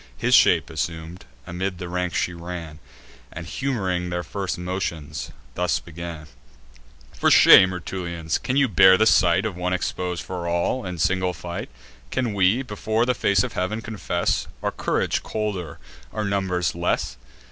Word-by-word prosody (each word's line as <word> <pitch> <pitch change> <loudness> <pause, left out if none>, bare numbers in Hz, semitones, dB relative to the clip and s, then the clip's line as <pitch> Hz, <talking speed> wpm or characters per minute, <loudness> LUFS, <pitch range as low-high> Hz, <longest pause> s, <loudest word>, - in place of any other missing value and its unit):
His - - 0
shape - - +5
assum'd, 80 +2 -5 0.2
amid 90 +2 -3
the 90 - -6
ranks 90 0 -2
she 90 - 0
ran, 85 -2 -7 0.5
And 85 - -7
humoring 95 -6 -2
their 90 0 -2
first 95 +3 -4
motions, 90 -4 -4 0.2
thus 90 -3 0
began: 85 -1 -8 0.9
"For - - +2
shame, 95 -1 +8
Rutulians, 85 -2 -3
can 130 - -1
you 140 -1 +4
bear 95 - +6
the 110 - +3
sight 90 -2 +4
Of 105 -4 -3
one 90 +1 -2
expos'd 90 -1 -3
for 90 -2 -5
all, 85 +8 -1
in 90 -1 -5
single 90 +2 +1
fight? 85 -1 -6 0.4
Can 120 - -1
we, 100 +6 +3
before 110 0 -1
the 125 - +2
face 100 -4 +2
of - - -4
heav'n, 100 +5 -2
confess 100 -6 -2 0.2
Our - - 0
courage - - -1
colder, 95 -8 -4 0.3
or 110 - -3
our - - -1
numbers 95 -3 0
less? 85 -7 -1
90 Hz, 160 wpm, -23 LUFS, 85-100 Hz, 0.9 s, shame